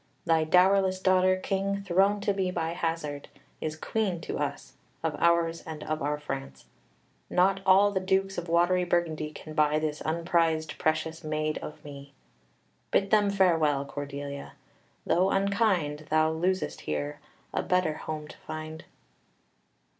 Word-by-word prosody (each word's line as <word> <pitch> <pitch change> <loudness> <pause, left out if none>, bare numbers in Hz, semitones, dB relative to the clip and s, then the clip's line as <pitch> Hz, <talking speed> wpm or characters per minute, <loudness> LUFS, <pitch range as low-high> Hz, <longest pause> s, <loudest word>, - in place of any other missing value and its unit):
Thy 165 -2 +3
dowerless 185 +2 +4
daughter, 185 0 +3
King, 195 +1 -2
thrown 195 +2 +2
to 200 0 +1
me 190 -2 0
by 165 -3 -2
hazard, 165 -4 -3 0.3
is 155 0 -3
Queen 190 +1 -1
of - - -1
us, - - -4 0.3
of - - -1
ours, 170 -1 +2
and 155 -1 -6
of 155 0 -3
our 145 +1 0
France; 135 -2 -6 0.6
not 195 +2 +3
all 195 +2 +6
the 190 - 0
Dukes 190 +1 0
of 170 -1 -8
watery 175 +2 +3
Burgundy 170 -3 0
can 155 0 -10
buy 150 -1 +3
this 155 -1 -2
unprized, 165 -1 0
precious 160 +1 -1
maid 155 0 -1
of 150 - -9
me. 140 -1 -10 0.8
Bid 195 0 +1
them 210 -2 +4
farewell, 165 -8 +2
Cordelia, 140 0 -6 0.5
though 185 +2 +3
unkind; 195 -7 +1
thou 155 0 +3
losest 180 +4 -1
here, 75 -1 -3 0.3
a - - 0
better 180 -4 +1
home 155 0 -6
to - - -12
find." 155 0 -7
165 Hz, 145 wpm, -28 LUFS, 155-185 Hz, 0.8 s, all